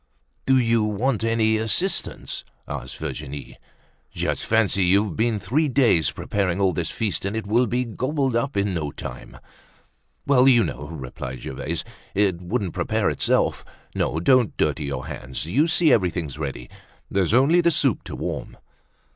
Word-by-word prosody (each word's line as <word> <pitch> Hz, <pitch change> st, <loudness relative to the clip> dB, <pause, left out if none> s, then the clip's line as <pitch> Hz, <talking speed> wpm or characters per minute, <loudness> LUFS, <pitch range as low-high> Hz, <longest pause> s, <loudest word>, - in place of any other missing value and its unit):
"Do 135 Hz, 0 st, +5 dB
you 115 Hz, -3 st, +3 dB
want 110 Hz, +3 st, 0 dB
any 115 Hz, -1 st, +2 dB
assistance?" 110 Hz, -, -1 dB, 0.2 s
asked 65 Hz, -, -6 dB
Virginie. 70 Hz, -1 st, -6 dB, 0.5 s
"Just -, -, -2 dB
fancy, 105 Hz, -3 st, +3 dB
you've 100 Hz, 0 st, +2 dB
been 115 Hz, -1 st, +1 dB
three 125 Hz, -, +1 dB
days 120 Hz, -, +3 dB
preparing 95 Hz, -3 st, -1 dB
all 95 Hz, -2 st, +3 dB
this 85 Hz, 0 st, -2 dB
feast 110 Hz, -3 st, -2 dB
and 100 Hz, +2 st, -2 dB
it 110 Hz, -, -3 dB
will 120 Hz, +4 st, +2 dB
be 125 Hz, +1 st, 0 dB
gobbled 130 Hz, +2 st, -1 dB
up 130 Hz, +1 st, -1 dB
in 100 Hz, -1 st, +1 dB
no 80 Hz, -4 st, -2 dB
time." 60 Hz, -3 st, -8 dB, 0.9 s
"Well, 135 Hz, -2 st, +5 dB
you 120 Hz, -4 st, +6 dB
know," 75 Hz, -3 st, -5 dB
replied 65 Hz, -4 st, -7 dB
Gervaise, -, -, -4 dB, 0.3 s
"it 95 Hz, -3 st, +2 dB
wouldn't 95 Hz, 0 st, -2 dB
prepare -, -, 0 dB
itself. -, -, +1 dB, 0.3 s
No, 80 Hz, -, -1 dB
don't 125 Hz, +5 st, +3 dB
dirty 75 Hz, -1 st, 0 dB
your 70 Hz, 0 st, -4 dB
hands. 65 Hz, +2 st, -5 dB
You 135 Hz, -, +2 dB
see 165 Hz, -1 st, +4 dB
everything's 85 Hz, -, 0 dB
ready. 70 Hz, -5 st, -5 dB, 0.4 s
There's 95 Hz, -3 st, +1 dB
only 150 Hz, +8 st, +5 dB
the 170 Hz, -, +4 dB
soup 140 Hz, -, +1 dB
to -, -, -6 dB
warm." -, -, -5 dB
105 Hz, 155 wpm, -23 LUFS, 85-125 Hz, 0.9 s, you